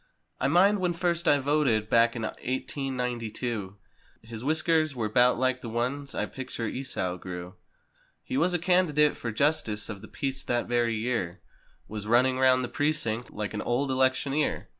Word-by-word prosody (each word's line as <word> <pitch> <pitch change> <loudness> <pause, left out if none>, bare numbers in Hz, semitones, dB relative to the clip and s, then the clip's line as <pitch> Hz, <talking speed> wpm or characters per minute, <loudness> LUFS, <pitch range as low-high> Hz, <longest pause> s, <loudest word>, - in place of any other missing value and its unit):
I 135 - +1
mind 190 +7 +4
when 180 -2 +1
first 170 0 -1
I 145 - +6
voted 135 -6 +1
back 115 +1 +4
in 110 -2 -2
eighteen 130 +1 -3
ninety 120 -2 -2
two. 105 -5 -4 0.5
His 110 0 -8
whiskers 155 0 +2
were 110 -3 -1
'bout 125 +3 +4
like 130 0 0
the 115 - -6
ones 130 +5 -2
I - - 0
picture 130 -3 -6
Esau 100 -7 -3
grew. 90 0 -7 0.7
He 260 - -5
was 180 -9 +2
candidate 170 -4 +3
for 115 - -4
Justice 125 -4 0
of 100 -3 -6
tht 110 - -12
Peace 135 -1 -3
that 120 -1 0
very 120 -1 +1
year 110 -6 -2 0.5
Was 105 -1 -6
running 130 +3 +3
round 130 -1 +4
the - - -2
precinct 125 -6 -1
like 105 0 -4
an 105 - -3
old 130 +3 0
elec¬ 130 0 +3
tioneer. 145 +2 -1
130 Hz, 175 wpm, -28 LUFS, 115-145 Hz, 0.7 s, I